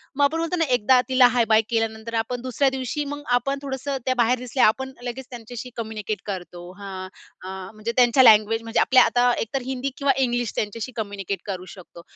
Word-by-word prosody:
मग 285 - +2
आपण 310 +3 +2
म्हणतो 330 +2 -1
ना, 325 - +2
एकदा 250 +2 +4
तिला 255 -1 +6
हाय-बाय 225 -2 +4
केल्यानंतर 225 0 -2
आपण 240 +2 -3
दुसऱ्या 255 +2 +1
दिवशी 265 +3 -3
मग 290 +1 -5
आपण 275 +3 -1
थोडंसं 275 0 -3
त्या 255 0 +1
बाहेर 245 +1 +2
दिसल्या, 250 +1 +1
आपण 265 +4 -1
लगेच 255 +2 -5
त्यांच्याशी 240 0 -8
कम्युनिकेट 215 -2 -4
करतो. 180 -3 -6 0.2
हां, 190 -2 -7 0.4
अ, 185 - -7 0.2
म्हणजे, 215 +2 -4
त्यांच्या 250 +1 +5
लँग्वेज 220 0 +6
म्हणजे 225 0 -1
आपल्या 260 - +6
आता 245 0 +3
एकतर 260 +5 -3
हिंदी 265 +1 -3
किंवा 280 -1 +2
इंग्लिश, 240 -2 -1
त्यांच्याशी 220 +4 -3
कम्युनिकेट 200 -3 -4
करू 185 -2 -5
शकतो. 175 -2 -13
240 Hz, 190 wpm, -23 LUFS, 215-260 Hz, 0.4 s, तिला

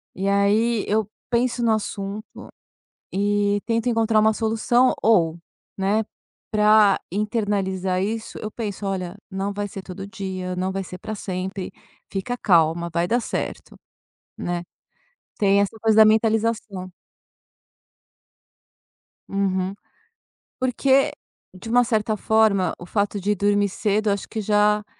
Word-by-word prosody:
E 195 +1 -2
aí 205 +3 +2
eu 215 0 0 0.2
penso 240 0 +1
no 230 - +3
assunto 205 0 -4 0.6
e 205 +1 +1
tento 230 +1 0
encontrar 225 -2 +3
uma 220 0 +4
solução, 225 +3 +2
ou, 170 -7 +3 0.4
né, 200 +3 +1 0.5
pra 210 -1 +5
internalizar 195 -3 -1
isso, 220 +3 -4
eu 215 - -5
penso: 205 -3 -5
"Olha, 185 -1 -3
não 195 +1 -2
vai 205 0 -3
ser 195 0 -8
todo 195 +1 -8
dia, 185 -2 -5
não 185 +1 -1
vai 195 0 -2
ser 180 +1 -9
pra 215 - -5
sempre, 190 -1 -4 0.4
fica 205 +6 -3
calma, 170 -4 +2
vai 170 +1 +1
dar 240 +4 +1
certo", - - -5 0.6
né. 175 0 -2 0.8
Tem 200 -1 +4
essa 200 +2 -2
coisa 220 0 +2
da 220 - +9
mentalização. 220 -3 +1 2.4
Uhum. 190 -1 0 0.9
Porque, 265 +2 +3 0.4
de 185 +5 -10
uma 245 +1 +5
certa 215 -2 0
forma, 215 -3 +2
o 175 - -10
fato 205 +1 -1
de 205 +2 +1
dormir 205 +1 +2
cedo 210 +2 0
eu 200 - +3
acho 200 - -7
que 220 - -4
já 210 0 +2
205 Hz, 130 wpm, -23 LUFS, 190-220 Hz, 2.4 s, da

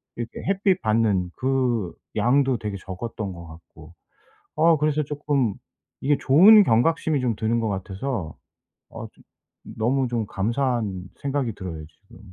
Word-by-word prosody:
이렇게 120 0 -5 0.2
햇빛 195 -1 +2
받는 105 -5 +1
그 125 -7 0 0.2
양도 130 +1 +2
되게 105 -3 -5
적었던 95 +2 -6
것 85 -1 -11
같고 80 0 -15 0.6
어 165 +1 +4
그래서 150 0 +1
쪼끔 145 -5 -1 0.5
이게 145 +1 +2
좋은 200 +10 +7
경각심이 150 +4 +2
좀 120 -3 0
드는 115 +2 0
것 110 - -1
같아서 95 - -4 0.6
어 - - -8
좀 - - -24 0.5
너무 130 +4 +1
좀 120 -2 -1
감사한 115 -2 -1 0.2
생각이 140 -4 -2
들어요 85 -5 -7
지금. 95 +5 -20
120 Hz, 270 characters per minute, -24 LUFS, 100-140 Hz, 0.6 s, 좋은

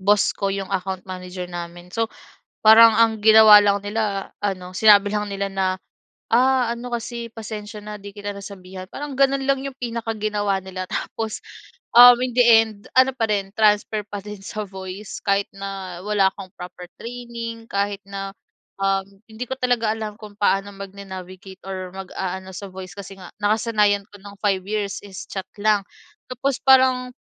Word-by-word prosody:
boss 205 +1 +3
ko 195 - -2
'yong 195 0 -3
account 190 -1 -3
manager 185 -1 -6
namin, 175 0 -8
so 225 +1 0 0.6
parang 220 0 +9
ang 225 -1 +3
ginawa 220 -1 +9
lang 200 0 +2
nila 205 -2 -2
ano, 185 -3 -3
sinabi 205 -1 +6
lang 210 0 -1
nila 200 0 -2
na, 195 -1 0 0.6
"Ah, 255 0 +3
ano 245 +1 -8
kasi 235 0 -4
pasensiya 210 -1 -7
na 210 0 -7
'di 200 0 -11
kita 205 -1 -5
nasasabihan." 190 -2 -9
Parang 290 -1 -6
gano'n 275 0 +3
lang 275 0 +2
'yong 275 -1 -7
pinaka 230 -2 -3
ginawa 205 -2 0
nila, 185 -1 -6
tapos, 220 -1 -4 0.6
um, 245 0 +11
in 255 - 0
the 245 - +6 0.2
end 215 -2 -11 0.2
ano 260 +1 +6
pa 230 -3 0
rin 200 -2 -1
transfer 210 0 +3
pa 205 0 -6
din 210 0 -8
sa 215 +2 -5
voice 190 +1 -8
kahit 200 0 +1
na 195 -2 -6
wala 200 -2 +3
akong 195 -2 -10
proper 180 0 -9
training 235 -1 -7
kahit 200 0 -1
na, 195 0 -5 0.5
um, 195 0 +1 0.3
hindi 220 +3 -5
ko 265 - -3
talaga 240 -3 +1
alam 215 -1 -5
kung 210 -1 -11
paano 200 0 +1
magna-navigate 190 -1 -9
or 185 -1 -5
mag-aano 190 0 -5
sa 200 0 -7
voice 185 -1 -9
kasi 195 -1 -9
nga 180 - -10
nakasanayan 210 -1 +2
ko 205 - -14
ng 200 +1 -12
5 195 -3 +1
years 205 -1 -2
is 190 -2 -8
chat 190 -1 -5
lang. 210 -1 +3 0.5
Tapos 265 +1 -1
parang 260 -1 +5
205 Hz, 170 wpm, -22 LUFS, 195-225 Hz, 0.6 s, um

